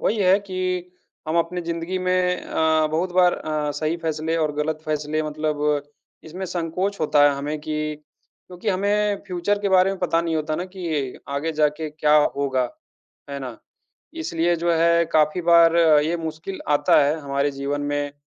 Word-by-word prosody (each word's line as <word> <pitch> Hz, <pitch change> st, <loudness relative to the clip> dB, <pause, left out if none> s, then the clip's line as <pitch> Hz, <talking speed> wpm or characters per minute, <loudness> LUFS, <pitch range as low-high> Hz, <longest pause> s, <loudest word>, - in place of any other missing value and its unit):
वही 220 Hz, -, 0 dB
है 190 Hz, -1 st, +4 dB
कि 185 Hz, -2 st, -3 dB, 0.4 s
हम 160 Hz, -, 0 dB
अपनी 175 Hz, +2 st, -1 dB
ज़िंदगी 170 Hz, +2 st, -3 dB
में 185 Hz, 0 st, +1 dB
अ, 160 Hz, -1 st, +1 dB
बहुत 170 Hz, +4 st, -2 dB
बार 180 Hz, -1 st, +4 dB
अ, 150 Hz, -1 st, -3 dB
सही 155 Hz, +3 st, -2 dB
फ़ैसले 160 Hz, 0 st, -2 dB
और 155 Hz, -2 st, 0 dB
गलत 155 Hz, +1 st, -1 dB
फ़ैसले 155 Hz, 0 st, -1 dB
मतलब 150 Hz, -1 st, -3 dB, 0.6 s
इसमें 180 Hz, +4 st, -6 dB
संकोच 180 Hz, +3 st, -3 dB
होता 145 Hz, -2 st, +3 dB
है 145 Hz, -, +5 dB
हमें 150 Hz, +2 st, -3 dB
कि 155 Hz, 0 st, -3 dB, 0.5 s
क्योंकि 180 Hz, +4 st, -6 dB
हमें 205 Hz, +2 st, +1 dB
फ्यूचर 185 Hz, +3 st, -1 dB
के 200 Hz, -, -1 dB
बारे 190 Hz, 0 st, +4 dB
में 195 Hz, -, -5 dB
पता 170 Hz, -2 st, +1 dB
नहीं 165 Hz, -1 st, -1 dB
होता 155 Hz, 0 st, -2 dB
ना 175 Hz, -, -3 dB
कि 155 Hz, -8 st, -3 dB
आगे 140 Hz, +3 st, -2 dB
जाके 150 Hz, 0 st, 0 dB
क्या 150 Hz, 0 st, +2 dB, 0.2 s
होगा, 135 Hz, -2 st, 0 dB, 0.7 s
है 140 Hz, -, -4 dB
ना? 125 Hz, -4 st, -7 dB, 0.6 s
इसलिए 175 Hz, -, 0 dB
जो 170 Hz, +1 st, 0 dB
है 170 Hz, +1 st, +3 dB
काफ़ी 155 Hz, +3 st, +3 dB
बार 170 Hz, 0 st, +5 dB, 0.3 s
ये 165 Hz, +3 st, 0 dB
मुश्किल 160 Hz, +4 st, -6 dB
आता 145 Hz, 0 st, +4 dB
है 150 Hz, +3 st, 0 dB
हमारे 140 Hz, 0 st, -1 dB
जीवन 140 Hz, +1 st, -3 dB
में 145 Hz, 0 st, -2 dB
160 Hz, 170 wpm, -23 LUFS, 150-180 Hz, 0.7 s, है